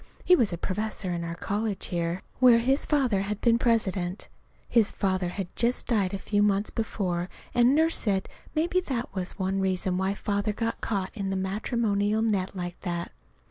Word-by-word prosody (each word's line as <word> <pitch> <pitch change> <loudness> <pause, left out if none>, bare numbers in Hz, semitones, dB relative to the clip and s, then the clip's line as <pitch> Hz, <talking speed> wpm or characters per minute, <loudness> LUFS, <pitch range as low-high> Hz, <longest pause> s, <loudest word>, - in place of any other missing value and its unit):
He 360 - +7
was 230 - +2
a 170 - -3
professor 205 +1 -3
in 170 -1 -2
our 170 0 -4
college 205 +2 -2
here, 170 +1 -2 0.2
where 250 -2 +7
his 265 +4 +2
father 255 -10 +2
had 205 +1 -3
been 235 0 +3
president. 195 -6 0 0.4
His 225 -3 +3
father 185 -3 0
had 185 0 -5
just 240 +1 +1
died 200 -6 +1
a 195 - -2
few 205 +1 0
months 205 0 +2
before, 185 -5 -2 0.2
and 245 +2 +5
Nurse 320 +2 +3
said 195 -3 0 0.3
maybe 345 +4 +2
that 255 - -3
was 185 -1 -3
one 190 0 -1
reason 185 -1 0
why 190 +1 0
Father 205 0 -1
got 230 +2 -3
caught 195 -3 -2
in 200 -3 -3
the 195 - -1
matrimonial 205 +2 0
net 200 -4 0
like 175 -1 -5
that. 175 -2 -3
200 Hz, 180 wpm, -27 LUFS, 185-230 Hz, 0.4 s, He